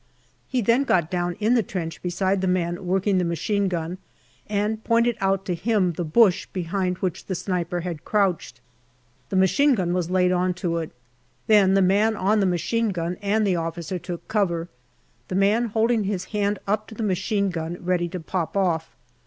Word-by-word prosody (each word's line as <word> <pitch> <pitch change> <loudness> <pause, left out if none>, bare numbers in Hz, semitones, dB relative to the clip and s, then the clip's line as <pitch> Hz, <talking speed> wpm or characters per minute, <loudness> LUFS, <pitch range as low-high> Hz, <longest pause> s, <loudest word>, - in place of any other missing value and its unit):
He 255 -2 0
then 235 +5 +3
got 175 - +1
down 175 -1 -1
in 220 +3 +1
the 240 - +4
trench 170 -5 -5
beside 185 +2 0
the 190 - 0
man 175 0 -1
working 190 +1 +2
the - - +1
machine 195 +4 0
gun, 175 0 -3 0.5
and 210 +1 -1
pointed 235 0 +2
out 195 0 +1
to 180 - -1
him 195 -1 +1
the 175 - -3
bush 190 +2 +3
behind 180 0 -2
which 185 -3 -3
the 185 - -2
sniper 175 -1 -2
had 170 -3 -5
crouched. 185 - 0 0.7
The - - -3
machine 255 +10 +4
gun 180 -4 -1
was 180 -2 -1
laid 180 0 +3
on 180 0 +1
to 175 -2 -2
it. 160 - -4 0.6
Then 205 -4 +5
the 195 - +4
man 205 +4 +3
on 210 +2 +2
the 195 - +3
machine 220 +6 0
gun 175 -2 -2
and 210 +2 +1
the 185 -3 +1
officer 165 +2 -4
took 175 0 -7
cover, 175 -5 0 0.6
the - - -4
man 205 +5 +3
holding 225 0 +1
his 195 -2 -2
hand 205 0 +1
up 210 +2 -1
to 220 - -11
the 225 - -4
machine 200 0 0
gun 165 0 -4
ready 175 -1 0
to 185 +1 -5
pop 175 +2 -3
off. 170 -4 0
185 Hz, 190 wpm, -24 LUFS, 175-210 Hz, 0.7 s, Then